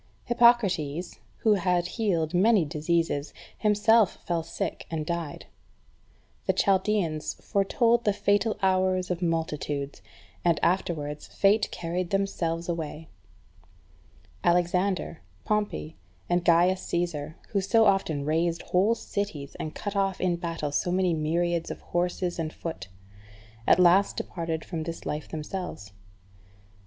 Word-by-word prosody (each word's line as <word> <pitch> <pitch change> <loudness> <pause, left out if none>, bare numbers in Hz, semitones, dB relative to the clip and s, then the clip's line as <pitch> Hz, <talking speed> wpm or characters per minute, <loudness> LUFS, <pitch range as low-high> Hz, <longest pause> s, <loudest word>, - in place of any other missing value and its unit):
3. - - -25
Hippocrates, 190 -10 +3 0.2
who 220 - +4
had 180 -3 +1
healed 175 -8 0
many 195 0 +4
diseases, 155 0 -1 0.2
himself 210 0 +4
fell 170 -1 0
sick, 160 - -5
and 155 -2 -3
died. 170 -3 -4 1.0
The - - +4
Chaldeans 190 -6 +1
foretold 230 +4 +1
the 210 - +3
fatal 205 +2 +1
hours 185 -1 +2
of 180 0 -2
multitudes, 150 -4 -2 0.4
and 170 -2 +3
afterwards 155 -5 -1
fate 205 +2 +2
carried 175 +1 -3
themselves 170 -4 -1
away. 160 -2 -4 1.3
Alexander, 180 0 +1 0.2
Pompey, 210 -7 -2 0.3
and 175 0 +1
Gaius 175 +2 +4
Caesar, 165 -3 -2
who 200 - 0
so 220 +4 +4
often 180 -8 +1
razed 165 +2 0
whole 200 +6 +2
cities, 200 -11 -4
and 155 - -5
cut 205 -1 -4
off 195 -1 0
in 180 -2 +1
battle 165 -4 -3
so 175 +4 0
many 185 -1 +2
myriads 165 +2 0
of - - -6
horse 175 +1 -2 0.2
and 160 -1 -2
foot, 165 - -6 0.8
at - - +6
last 185 +2 +4
departed 165 -2 -3
from 165 -3 -4
this 165 +1 -6
life 150 0 -4
themselves. 155 - -6
175 Hz, 125 wpm, -27 LUFS, 160-195 Hz, 1.3 s, at